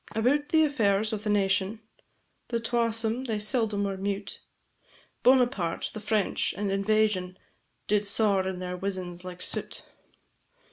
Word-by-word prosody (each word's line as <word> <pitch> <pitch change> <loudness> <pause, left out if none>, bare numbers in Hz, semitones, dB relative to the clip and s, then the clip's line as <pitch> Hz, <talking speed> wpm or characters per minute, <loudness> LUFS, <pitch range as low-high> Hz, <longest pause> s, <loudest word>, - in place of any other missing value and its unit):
About 275 +6 +1
the 315 -1 +5
affairs 220 -6 +1
o' - - 0
the 210 +1 -4
nation, 200 +1 +1 0.7
The 235 - -1
twasome 230 +1 0
they 220 -2 -1
seldom 210 -1 +1
were 195 -1 -2
mute; 200 +1 -4 0.8
Bonaparte, 245 -9 +2
the 215 - -6
French, 215 -2 0
and 200 -1 -1
invasion, 195 -2 +1 0.5
Did 210 -1 +1
saur 200 -3 +3
in 190 -1 -3
their 180 0 -4
wizens 180 -2 -4
like 180 -1 -7
soot. - - -3
210 Hz, 135 wpm, -27 LUFS, 195-225 Hz, 0.8 s, the